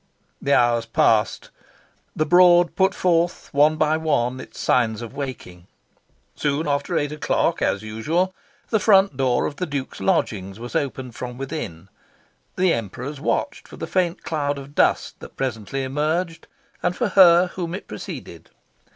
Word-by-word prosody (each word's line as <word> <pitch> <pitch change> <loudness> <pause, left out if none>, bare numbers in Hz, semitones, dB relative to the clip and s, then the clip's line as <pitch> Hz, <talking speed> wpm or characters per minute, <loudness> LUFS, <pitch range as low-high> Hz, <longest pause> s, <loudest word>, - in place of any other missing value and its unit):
The 140 - +2
hours 120 -1 +2
passed. 110 -1 +1 0.6
The 155 - +1
Broad 175 +1 +5
put 190 0 +2
forth, 175 -1 0
one 150 +2 +4
by 155 0 +2
one, 130 -6 0
its - - -11
signs 115 -2 +1
of 115 - -8
waking. 125 -11 -7 0.7
Soon 150 +2 -1
after 140 0 0
eight 145 0 -1
o'clock, 150 - 0
as 100 - 0
usual, 155 +13 -1 0.4
the 220 - +3
front 195 -5 +4
door 130 -2 +1
of 145 - -4
the 180 - -2
Duke's 140 -3 -5
lodgings 105 - -1
was 120 -1 -8
opened 130 -3 -2
from 125 +1 -7
within. 130 - -6 0.7
The 185 -2 +3
Emperors 125 +6 -5
watched - - -2
for - - -12
the - - -4
faint 180 -2 -1
cloud 145 -3 -2
of 140 +1 -10
dust - - +1
that - - -12
presently 130 +1 -3
emerged, 155 +5 -2 0.3
and 180 0 0
for - - 0
her 180 -1 +6
whom 175 -1 -4
it 190 - -9
preceded. - - -8
145 Hz, 155 wpm, -22 LUFS, 120-170 Hz, 0.7 s, her